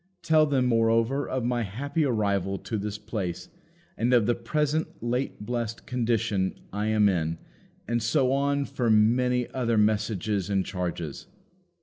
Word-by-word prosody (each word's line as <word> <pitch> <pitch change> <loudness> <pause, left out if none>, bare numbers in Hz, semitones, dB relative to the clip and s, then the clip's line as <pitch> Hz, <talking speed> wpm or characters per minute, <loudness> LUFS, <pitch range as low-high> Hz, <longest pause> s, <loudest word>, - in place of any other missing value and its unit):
Tell 155 -1 +4
them, 135 -3 +2
moreover, 115 +3 +2
of 130 -2 -1
my 120 0 0
happy 140 - -1
arrival 100 -6 0
to 110 +1 -4
this 105 +1 -4
place, 105 -5 -5 0.5
and 120 +3 0
of 115 -3 +4
the 120 - +3
present 150 +6 0 0.2
late 120 -2 -2
blessed 120 -1 -3
condition 115 -6 0 0.2
I 105 +1 -1
am 110 -1 +4
in, 85 -4 0 0.5
and 120 +1 0
so 130 +3 +2
on 140 +1 +1
for 120 -4 -1
many 125 +3 +3
other 120 -3 0
messages 105 -2 +1
and 95 -2 +1
charges." 85 -5 -4
115 Hz, 145 wpm, -27 LUFS, 105-125 Hz, 0.5 s, Tell